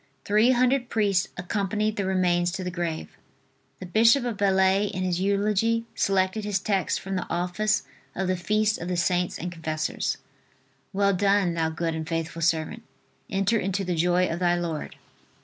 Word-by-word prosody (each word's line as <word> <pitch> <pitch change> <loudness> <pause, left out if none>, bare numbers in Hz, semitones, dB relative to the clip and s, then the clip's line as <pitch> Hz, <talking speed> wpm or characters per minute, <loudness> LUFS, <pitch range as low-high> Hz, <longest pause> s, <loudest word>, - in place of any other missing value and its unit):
Three 215 +4 +4
hundred 255 0 +2
priests 200 -4 +1
accompanied 210 +4 -1
the 200 -2 -2
remains 175 -2 +2
to 190 - -4
the 180 - -3
grave. 170 -2 -4 0.6
The 185 - -7
bishop 230 +7 +4
of 240 -3 -2
Belley, 195 0 +3
in 185 -2 -3
his 180 -1 -1
eulogy, 210 +3 +1
selected 195 +2 +1
his 205 -1 0
text 195 -1 0
from 195 0 -5
the 185 - -3
office 180 +5 0 0.3
of 190 - -1
the 185 - +1
feast 215 +4 0
of 175 - -5
the 180 -1 -1
Saints 180 0 0
and 175 +1 -5
Confessors: 155 -2 -2 0.7
"Well 200 0 +2
done, 195 -1 +2
thou 165 -1 0
good 165 0 -2
and 160 -1 -5
faithful 165 0 -3
servant, 165 +7 0 0.5
enter 200 +2 +1
into 195 +1 -1
the 180 -1 -1
joy 180 +2 +2
of 170 - -3
thy 175 -1 +2
Lord." 170 -3 -4
190 Hz, 170 wpm, -26 LUFS, 175-205 Hz, 0.7 s, Three